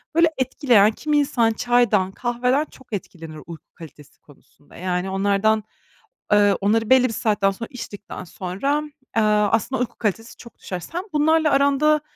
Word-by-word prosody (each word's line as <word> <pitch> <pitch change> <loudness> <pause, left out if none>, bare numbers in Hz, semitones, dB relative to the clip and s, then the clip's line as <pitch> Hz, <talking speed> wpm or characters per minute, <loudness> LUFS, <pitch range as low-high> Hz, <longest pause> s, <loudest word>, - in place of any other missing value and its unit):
Böyle, 335 0 +5
etkileyen 245 -5 +3
kimi 300 +6 -1
insan 240 -5 +2
çaydan, 220 -6 +2
kahveden 250 +6 0
çok 260 - -18
etkilenir 165 -5 -7
uyku 165 -3 -10
kalitesi 150 -4 -14
konusunda. 145 0 -22
Yani, 180 +1 -2
onlardan, 200 +3 +1 0.7
eee 205 -2 +4
onları 220 +2 +1
belli 255 -1 +5
bir 225 - -5
saatten 205 -3 +1
sonra 225 +4 -7
içtikten 205 -5 -8
sonra, 195 - -3 0.3
eee, 225 - +3
aslında, 210 +4 +1
uyku 250 - -4
kalitesi 225 +1 -3
çok 235 - -14
düşer. 180 -2 -6
Sen 345 - -6
bunlarla 310 +1 +3
aranda 280 +2 +3
225 Hz, 150 wpm, -22 LUFS, 195-260 Hz, 0.7 s, Böyle